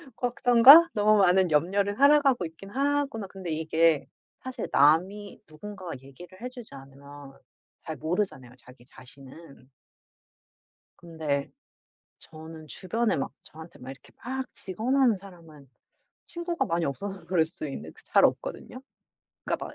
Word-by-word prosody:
'걱정과 250 +6 +7
너무 215 0 +3
많은 190 -2 +4
염려로 195 +7 +1
살아가고 280 -5 +4
있긴 165 +4 -11
하구나.' 275 -2 -1
근데 190 -2 -9
이게 160 -1 +1 0.4
사실 260 0 -6
남이 185 +8 +2
누군가가 185 +2 -9
얘기를 175 +8 -14
해 250 - -5
주지 245 - -12
않으면 140 +1 -13 0.5
잘 160 - -7
모르잖아요, 155 -5 -3
자기 125 -1 -18
자신은. 135 +2 -15 1.3
근데 155 -5 -4 0.7
저는 160 0 -11
주변에 220 +8 -1
막 135 - -4
저한테 160 +2 -13
막 130 +1 -9
이렇게 135 - -15
막 260 +1 -5
직언하는 235 +4 0
사람은 165 -7 -16 0.6
친구가 345 0 -3
많이 170 0 -1
없어서 190 +8 -6
그럴 175 -4 +2
수도 160 -1 -7
있는데 140 - -7
그 445 - -19
잘 - - +3
없거든요. - - -2 0.6
그러니까 - - -3
막 - - -12
180 Hz, 305 characters per minute, -26 LUFS, 155-230 Hz, 1.3 s, 걱정과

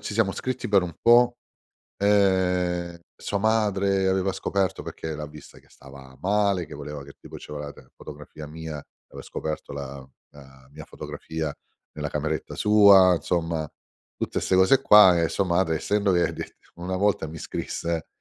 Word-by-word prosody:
ci 105 - -6
siamo 105 -3 +2
scritti 130 -1 -4
per 100 -3 +4
un 85 -2 -6
po'. 120 +1 +5 0.7
Ehm, 90 -4 +1 0.2
sua 100 - -3
madre 100 -3 +1
aveva 95 0 +1
scoperto, 95 0 -2
perché 80 -1 -6
l'ha 75 0 -6
vista 75 0 -14
che - - -26
stava 65 -1 -15
male, 100 -2 +1
che 75 - -15
voleva 75 -1 -7
che 70 - -13
tipo - - -11
ci - - -11
voleva 75 -1 -6
te - - -17
fotografia 75 -1 -11
mia, 80 -1 -7 0.3
aveva - - -10
scoperto 80 -2 -6
la 70 -1 -8 0.2
la 65 -2 -17
mia 75 +1 -10
fotografia 80 -2 -6 0.4
nella 75 -1 -4
cameretta 75 +1 -3
sua, 100 -4 +6
insomma 80 -3 -2 0.5
tutte - - -3
ste - - 0
cose 95 +9 +5
qua, 105 -8 +7
e 85 - +1
sua 100 - -1
madre 85 -2 +1
essendo 100 +3 0
che 85 -1 +1
de - - -8 0.2
una 90 +2 -4
volta 100 -4 +1
mi 80 +1 -9
scrisse, 85 +1 -4
90 Hz, 165 wpm, -25 LUFS, 75-100 Hz, 0.7 s, qua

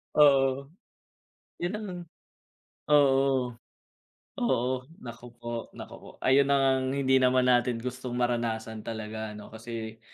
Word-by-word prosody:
Oo. 140 -1 +4 0.9
Yun 175 +3 -1
lang. 210 -1 -5 1.0
Oo. 135 -3 +3 0.9
Oo. 125 - +1 0.4
Naku 120 +1 -9
po, 120 -1 -5
naku - - -9
po. - - -12 0.2
Ayun 135 +1 +5
na - - +5
ngang 130 -1 +2
hindi 130 -1 +3
naman 125 0 +4
natin 125 -1 +3
gustong 125 0 -5
maranasan 115 -2 -1
talaga 110 -1 -5
ano 105 0 -10
kasi, 110 0 -7
125 Hz, 120 wpm, -28 LUFS, 115-135 Hz, 1.0 s, Ayun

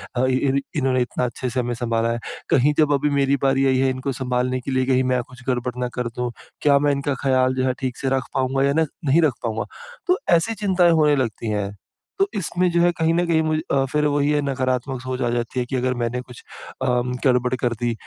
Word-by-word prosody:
अ, 125 +2 +2
इन 130 +1 +1 0.2
इन्होंने 130 -3 +1
इतना 125 +1 -1
अच्छे 125 +1 -4
से 125 +1 -2
हमें 120 0 -1
संभाला 115 -1 0
है, 120 - -2 0.3
कहीं 145 +3 +4
जब 150 -2 +4
अभी 145 +1 +1
मेरी 140 0 +3
बारी 135 0 +3
आई 130 -1 +3
है 135 0 +2
इनको 130 +1 -2
संभालने 125 0 0
के 135 - -5
लिए, 130 0 +1
कहीं 130 0 +2
मैं 125 -1 +1
कुछ 125 -1 -14
गड़बड़ 125 -1 -1
ना 125 - 0
कर 125 - -1
दूँ, 125 -1 -1 0.3
क्या 140 -1 +5
मैं 145 0 +2
इनका 140 0 -1
ख़्याल 130 -1 +2
जो 130 0 0
है, 130 - +1
ठीक 130 -3 -3
से 135 - -1
रख 130 - -4
पाऊँगा 135 +1 +1
या 140 0 +2
न - - +3 0.2
नहीं 150 +5 +4
रख 150 -6 +3
पाऊँगा? 110 -1 -2 0.4
तो 360 - +3 0.2
ऐसी 225 +7 -1
चिंताएँ 180 -3 +4
होने 150 -2 +4
लगती 115 -3 -2
हैं। 100 -1 -2 0.5
तो 390 - +4
इसमें 180 -1 0
जो 170 0 +2
है 175 0 +4
कहीं 165 0 +2
न 175 +1 +2
कहीं 160 -1 +3
मुझे 155 0 0
अ, 135 -1 +3
फिर 150 0 +1
वही 145 0 +2
है 145 -1 +2
नकारात्मक 130 0 -1
सोच 130 0 -4
आ 120 - +1
जाती 120 +1 -2
है 125 - -1
कि 130 - -4
अगर 130 0 0
मैंने 120 +2 -1
कुछ 125 -2 -13 0.4
अ, - - 0 0.4
गड़बड़ 125 0 +2
कर 120 -1 +1
दी। 120 -1 0
130 Hz, 240 wpm, -22 LUFS, 125-145 Hz, 0.5 s, क्या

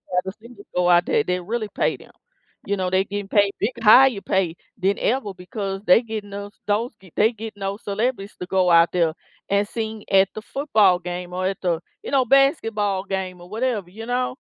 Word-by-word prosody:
have 180 - +2
the 190 - -5
singers 230 -2 -14
go 180 0 +2
out 175 0 +5
there - - +2
and 220 - -1
then 180 -1 -1
really 225 -1 -2
pay - - +1
them. - - -17 0.5
You 200 0 -1
know, 185 -1 -1
they 190 +1 +2
getting 200 0 -5
paid 200 -1 +3
big 215 +5 0
higher 240 -1 +7
pay 180 -3 0 0.3
than 195 +2 +2
ever 225 -5 0
because 195 +1 -5
they 200 +6 +6
getting 215 -3 -6
those 200 0 -7
those 215 +3 -1
g 185 -3 -18
they 220 +3 +4
getting 220 -2 -9
those 195 +2 -4
celebrities 205 0 -2
to 180 - -5
go 185 -2 +2
out 170 0 +6
there 170 -3 +1 0.4
and 200 +1 +2
sing 220 -2 -5
at 195 0 +5
the 215 - -6
football 215 -10 +2
game 180 0 -6
or 185 +1 -2
at 195 +1 -1
the, 170 -3 0 0.2
you - - -7
know, 265 -2 +3
basketball 225 - +2
game 190 -2 -4
or 175 - -12
whatever, 220 -4 -2
you 225 +3 -8
know? 250 +1 -1
200 Hz, 215 wpm, -22 LUFS, 185-220 Hz, 0.5 s, higher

